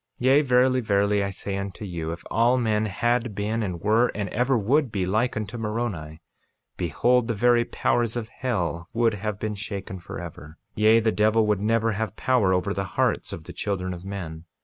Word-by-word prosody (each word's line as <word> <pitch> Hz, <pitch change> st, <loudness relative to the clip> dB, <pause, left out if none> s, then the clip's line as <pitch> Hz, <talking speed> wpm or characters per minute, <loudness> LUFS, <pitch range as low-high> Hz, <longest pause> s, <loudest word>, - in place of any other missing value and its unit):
48:17 125 Hz, -, -3 dB
Yea, 135 Hz, +3 st, +6 dB
verily, 130 Hz, -1 st, +3 dB
verily 100 Hz, -1 st, +2 dB
I 100 Hz, -, -1 dB
say 100 Hz, 0 st, -4 dB
unto 100 Hz, +1 st, -5 dB
you, 85 Hz, -4 st, -4 dB
if 85 Hz, -, -7 dB
all 120 Hz, +3 st, +3 dB
men 110 Hz, -3 st, +1 dB
had 120 Hz, +2 st, 0 dB
been, 110 Hz, +3 st, -1 dB
and 90 Hz, -5 st, -3 dB
were, 110 Hz, +4 st, +3 dB
and 100 Hz, -1 st, -2 dB
ever 125 Hz, +3 st, +1 dB
would 130 Hz, +5 st, +2 dB
be, 95 Hz, -3 st, -1 dB
like 110 Hz, +6 st, 0 dB
unto 110 Hz, +2 st, -4 dB
Moroni, 105 Hz, -9 st, -4 dB, 0.5 s
behold, 115 Hz, -, +2 dB
the 115 Hz, -, -1 dB
very 120 Hz, +2 st, +3 dB
powers 120 Hz, -1 st, 0 dB
of 115 Hz, -2 st, -4 dB
hell 90 Hz, -11 st, -3 dB
would 115 Hz, -1 st, +2 dB
have 105 Hz, 0 st, -4 dB
been 110 Hz, -1 st, -2 dB
shaken 100 Hz, -2 st, -6 dB
forever; 80 Hz, -2 st, -9 dB, 0.2 s
yea, 110 Hz, +2 st, +5 dB
the 110 Hz, 0 st, +2 dB
devil 110 Hz, +1 st, +3 dB
would 105 Hz, -2 st, +1 dB
never 115 Hz, +1 st, +2 dB
have 110 Hz, -1 st, -3 dB
power 125 Hz, -8 st, +2 dB
over 95 Hz, +2 st, +1 dB
the 100 Hz, -, -2 dB
hearts -, -, +1 dB
of -, -, -7 dB
the -, -, -10 dB
children 95 Hz, -3 st, -2 dB
of 85 Hz, 0 st, -9 dB
men. 90 Hz, -5 st, -6 dB
105 Hz, 195 wpm, -25 LUFS, 95-120 Hz, 0.5 s, Yea